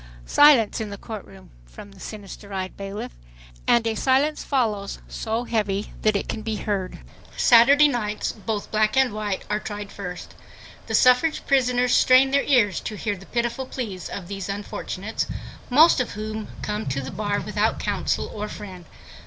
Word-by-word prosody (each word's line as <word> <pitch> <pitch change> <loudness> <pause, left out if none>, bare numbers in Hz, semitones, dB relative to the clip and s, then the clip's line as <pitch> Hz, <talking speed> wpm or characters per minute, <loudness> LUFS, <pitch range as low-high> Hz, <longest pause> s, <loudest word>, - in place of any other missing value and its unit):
"Silence 260 - +5
in 215 - -4
the 200 - -7
court 215 0 -7
room," 190 -1 -16 0.2
from 200 - -12
the 195 - -17
sinister 200 0 -9
eyed 185 -1 -4
bailiff. 200 +1 -6 0.6
And 235 -1 +4
a 225 - +1
silence. 270 +6 +1
follows 215 -7 -1
so 225 +1 -3
heavy 210 -4 -2
that 215 -1 +2
it 200 - -1
can 220 - -4
be 220 0 -3
heard. 200 -3 -3 0.4
Saturday 275 +5 +7
night's 215 -6 -2
both 215 -1 -5
black 215 +2 +2
and 265 -4 +3
white—are 210 0 -2
tried 205 -1 -6
first. 180 -3 -7 0.5
The - - 0
suffrage 255 +5 +4
prisoners 250 -2 +2
strain 260 +1 +5
their 280 0 +4
ears 230 -8 +3
to 215 - -6
hear 205 0 -2
the 195 0 -14
pitiful 240 +2 -2
pleas 205 -10 -5
of 180 -3 -6
these 195 0 -5
unfortunates, 200 +1 -4 0.4
most 300 +5 +6
of 250 - -4
whom 215 +1 -5 0.2
come 210 +1 -3
to 135 +1 -1
the 135 - -6
bar 205 -1 -1
without - - 0
counsel - - -1
or 210 0 -4
friend. 190 -5 -9
215 Hz, 170 wpm, -24 LUFS, 200-245 Hz, 0.6 s, Saturday